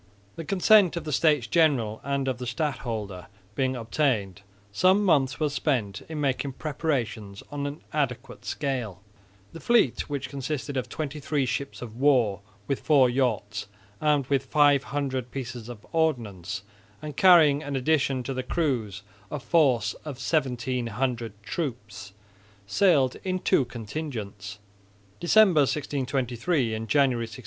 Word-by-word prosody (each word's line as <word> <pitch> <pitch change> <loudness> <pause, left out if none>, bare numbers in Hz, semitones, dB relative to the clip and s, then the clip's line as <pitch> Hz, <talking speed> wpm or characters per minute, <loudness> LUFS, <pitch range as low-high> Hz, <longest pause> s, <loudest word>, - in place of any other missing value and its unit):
The 165 - -6
consent 195 +1 +4
of 170 - -3
the 155 - -5
States 150 -3 +3
General 120 -6 +2
and 140 0 -1
of 130 -2 -2
the 125 - -5
stadholder 115 - -3 0.3
being 130 +3 0
obtained, 115 -5 -1 0.3
some 185 - +4
months 135 -8 +2
were 155 - +2
spent 130 -8 -1
in 160 -2 -4
making 140 -1 -1
preparations 120 -10 -3
on 145 -1 -3
an 145 +2 -7
adequate 140 -5 -2
scale. 120 - -3 0.5
The 165 - -8
fleet, 235 - +2
which 140 -2 -3
consisted 140 0 -4
of 125 -2 -2
twenty 150 +1 -4
three 145 -1 0
ships 135 +1 -4
of 115 -1 -9
war 125 -8 +3 0.3
with 140 - -1
four 135 -5 +4
yachts, 110 -6 -1 0.3
armed 150 -3 +2
with 135 0 0
500 140 -2 +1
pieces 120 -3 -6
of 115 -4 -10
ordnance, 105 - -1 0.4
and 150 -1 -7
carrying 160 -6 +6
in 145 -2 -4
addition 135 -1 +1
to 135 - -4
the 130 - -2
crews 125 - -2 0.3
a 150 - -4
force 125 - +2
of 150 -3 -6
1700 125 -5 -2
troops, 110 - -5 0.5
sailed 140 - +3
in 185 -1 -1
two 140 -6 +2
contingents, 110 -5 -6 0.6
December, 180 -3 +5
1623, 135 -2 -1
and 110 +1 -4
January, 130 -3 +2
1624. 110 -2 -10
135 Hz, 140 wpm, -26 LUFS, 115-150 Hz, 0.6 s, carrying